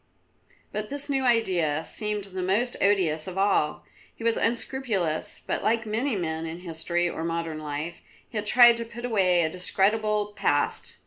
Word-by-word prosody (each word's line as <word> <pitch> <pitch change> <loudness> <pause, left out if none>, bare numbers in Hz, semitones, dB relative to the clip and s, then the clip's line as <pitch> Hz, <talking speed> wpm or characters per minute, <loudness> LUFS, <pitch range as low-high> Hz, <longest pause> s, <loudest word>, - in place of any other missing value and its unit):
But 210 0 -4
this 285 0 -2
new 270 -1 +1
idea 180 -10 +2
seemed 210 -2 -3
the 190 -1 -6
most 210 +7 +1
odious 180 -6 +2
of 185 0 -6
all. 195 -6 +1 0.3
He - - -10
was 230 0 +3
unscrupulous, 230 -9 -1
but - - -2
like 230 +1 +1
many 225 +4 -1
men 160 -3 -2
in 165 +2 -7
history 175 0 -1
or 165 - -4
modern 165 -1 -3
life, 155 +3 -5 0.3
he - - -16
had 210 -1 -1
tried 240 +1 +7
to 230 - -4
put 240 +1 -7
away 185 -7 +3
a 160 - +1
discreditable 210 +3 +1
past. 145 -6 0
195 Hz, 170 wpm, -26 LUFS, 165-230 Hz, 0.3 s, tried